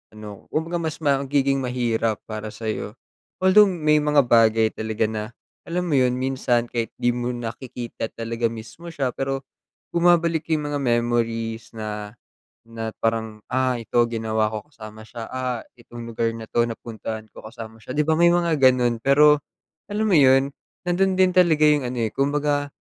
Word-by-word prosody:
ano 105 -2 -10
kumbaga 165 +2 -2
mas 160 -2 -3
magiging 140 -1 +2
mahirap 120 -3 -1
para 110 -1 -6
sa'yo. 110 0 -5 0.5
Although 205 +2 +7
may 155 -4 +2
mga 150 -2 +3
bagay 115 -2 +4
talaga 110 0 -2
na 105 -1 -3 0.4
alam 180 +1 -1
mo 135 - +4
yun 125 -1 +2
minsan 125 -2 0
kahit 115 -2 -3
di 120 - +1
mo 120 0 -3
nakikita 120 0 -6
talaga 115 0 -1
mismo 115 +9 -9
siya 140 -6 -2
pero 135 +1 -3 0.5
bumabalik 170 -2 +2
yung 150 -1 -3
mga 145 - -1
memories 120 -2 -1
na 105 0 -6 0.5
na 115 -1 -5
parang, 110 -1 -1
ah, 130 -2 0
ito 115 - -6 0.2
ginawa 110 -1 0
ko 110 - -3
kasama 110 -5 -11
siya, 115 +1 -8
ah, 125 -2 -2 0.2
itong 120 0 -10
lugar 115 0 0
na 115 - -7
'to 120 0 +2
napuntahan 110 -1 -6
ko - - -12
kasama 110 0 -10
siya. 125 +4 -8
Di 150 - +4
ba 160 +1 +1
may 170 - +6
mga 170 -3 +1
ganun 125 -3 +4
pero 150 +4 +5 0.5
alam 210 +2 -1
mo 190 -7 +4
yun 135 0 +5 0.3
nandun 185 +1 +1
din 185 -1 +4
talaga 160 -4 +5
yung 145 -3 +3
ano 125 0 -3
eh, 110 - +1
kumbaga, 145 +1 0
125 Hz, 165 wpm, -23 LUFS, 115-150 Hz, 0.5 s, Although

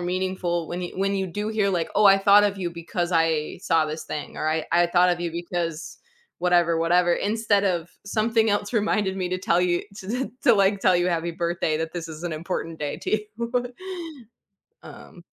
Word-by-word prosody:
meaningful 180 -1 -2
when 175 +2 -5
you 175 - -6
when 195 +1 +1
you 190 -1 -1
do 205 +4 -4
hear, 215 -2 +1
like, 175 -4 -1
"Oh, 210 -1 +5
I 195 - +8
thought 200 +1 +6
of 205 -1 0
you 175 -3 -3
because 170 +1 -3
I 165 -2 +1
saw 160 -1 +2
this 155 +1 -5
thing," 150 - -6
or 155 - -1
"I 160 0 0
I 175 0 +4
thought 175 +1 +4
of 175 0 -1
you 170 - -2
because 170 -1 -4 0.4
whatever, 175 -2 +3
whatever, 175 +1 +3
instead 210 -1 +1
of 175 -3 0 0.2
something 220 +2 +1
else 205 +1 -1
reminded 210 -3 +1
me 185 -2 -2
to 185 - -1
tell 175 -1 +2
you 175 -1 +1
to 235 +7 -3
to, 275 - +6
like, 200 -1 +3
tell 185 -2 +4
you 175 +1 +1
happy 170 -1 -1
birthday, 170 -2 -1
that 160 0 -3
this 170 -2 -4
is 155 0 -9
an 175 - -2
important 165 0 -4
day 145 -1 -3
to - - -5 0.3
you." 235 0 -4 1.3
Um - - -13
175 Hz, 205 wpm, -24 LUFS, 170-200 Hz, 1.3 s, I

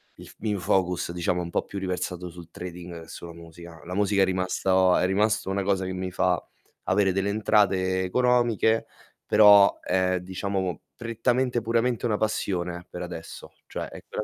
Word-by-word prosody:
il - - -13
f - - -13
il 110 - -2
mio 100 - -1
focus 90 -1 0
diciamo 90 +1 -1
un 85 - -5
po' - - -1
più 100 - -7
riversato 90 -1 -3
sul 85 -1 -12
trading 90 -1 -8
che - - -15
sulla 85 0 -9
musica. 85 0 -12
La 90 +1 -5
musica 100 -1 +2
è - - +6
rimasto 95 0 +2
a - - +3
è - - +2
rimasta 100 +1 +1
una 95 0 -1
cosa 95 -1 0
che 95 - -3
mi 90 0 -4
fa 90 -1 +1 0.5
avere 95 0 +3
delle 95 +2 0
entrate 95 -3 +2
economiche, 120 +1 +2 0.4
però, 100 -2 +7
è 95 -1 0
diciamo 95 -1 -3 0.2
prettamente 120 +1 0
puramente 115 +2 0
una 105 -2 0
passione, 90 -5 -2
per 90 - -7
adesso. 85 -2 -9
Cioè, - - -5
ecco - - -6
95 Hz, 175 wpm, -26 LUFS, 90-105 Hz, 0.5 s, però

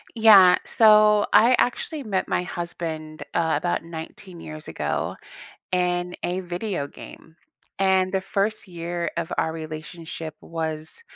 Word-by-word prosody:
Yeah, 200 -5 +8
so 210 -1 +5
I 245 +3 +6
actually 285 +4 -1
met 195 -4 -1
my - - 0
husband, 165 -3 -5
uh, 160 -1 +1
about 175 -1 -1
19 170 +2 -9
years 155 0 -9
ago - - -3 0.6
in 180 -1 0
a 180 +2 -1
video 180 -3 -3
game. 160 +2 -13 0.4
And 190 -1 +2
the 190 - +1
first 200 +3 -2
year 170 -1 -4
of 170 -1 -3
our 160 - +1
relationship 160 0 -7
was 160 - -5
175 Hz, 130 wpm, -24 LUFS, 160-195 Hz, 0.6 s, Yeah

